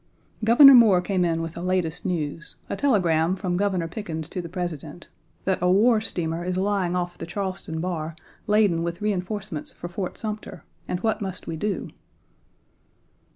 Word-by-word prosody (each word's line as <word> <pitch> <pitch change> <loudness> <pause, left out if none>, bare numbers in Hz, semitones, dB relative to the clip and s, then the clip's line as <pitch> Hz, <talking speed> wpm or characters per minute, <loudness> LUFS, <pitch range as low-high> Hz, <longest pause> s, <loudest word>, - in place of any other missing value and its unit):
Governor 270 +5 +9
Moore 220 -7 +7
came 180 0 0
in 165 -1 0
with 165 -1 -5
the 170 - -7
latest 180 -1 -1
news 165 -2 -3 0.2
a - - 0
telegram 175 - +2
Page - - -4
9 - - -16
from 180 -3 -1
Governor 185 -4 0
Pickens 165 -4 -5
to 180 - -4
the 170 - -8
President, 170 -3 -5 0.2
" - - -38
that 190 -1 +1
a 180 - +3
war 215 +4 +4
steamer 170 -5 -3
is 180 0 -2
lying 190 -2 0
off 175 -1 -3
the 165 - -6
Charleston 185 -3 -4
bar 165 -2 -3 0.3
laden 205 -5 +3
with 170 +1 -3
reenforcements 195 -4 -3
for 175 - -8
Fort 180 +1 -5
Sumter, 215 -1 -6 0.2
and 180 - -2
what 220 +1 0
must 190 -2 -5
we 165 - -4
do?" 205 +5 -3
180 Hz, 180 wpm, -25 LUFS, 170-205 Hz, 0.3 s, Governor